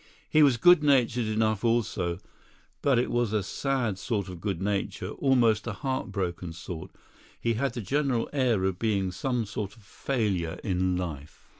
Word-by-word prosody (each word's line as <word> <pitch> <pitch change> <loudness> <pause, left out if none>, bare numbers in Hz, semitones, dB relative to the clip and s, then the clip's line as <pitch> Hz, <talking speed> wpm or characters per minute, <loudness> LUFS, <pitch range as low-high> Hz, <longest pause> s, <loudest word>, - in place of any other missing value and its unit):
He 155 - +4
was 135 -5 +5
good 175 +6 +6
natured 125 -5 +3
enough 110 -1 0
also, 100 -7 0 0.6
but 140 -3 +3
it 120 - +1
was 120 -3 +1
a 105 -2 +1
sad 120 -3 -1
sort 100 -4 -2
of 90 -2 -8
good 100 -4 -2
nature, 100 +1 -2
almost 120 -5 +2
a 115 - -2
heart 130 +4 -3
broken 90 -3 -3
sort 85 -1 -7 0.5
he 115 - 0
had 125 +2 -1
the 120 - -3
general 135 +2 0
air 125 -8 +2
of 95 -1 -1
being 100 -5 0
some 120 +5 -1
sort 105 -1 -5
of 110 - -19
failure 100 -8 -2
in 90 -2 0
life. 80 -5 -6
110 Hz, 170 wpm, -28 LUFS, 95-125 Hz, 0.6 s, good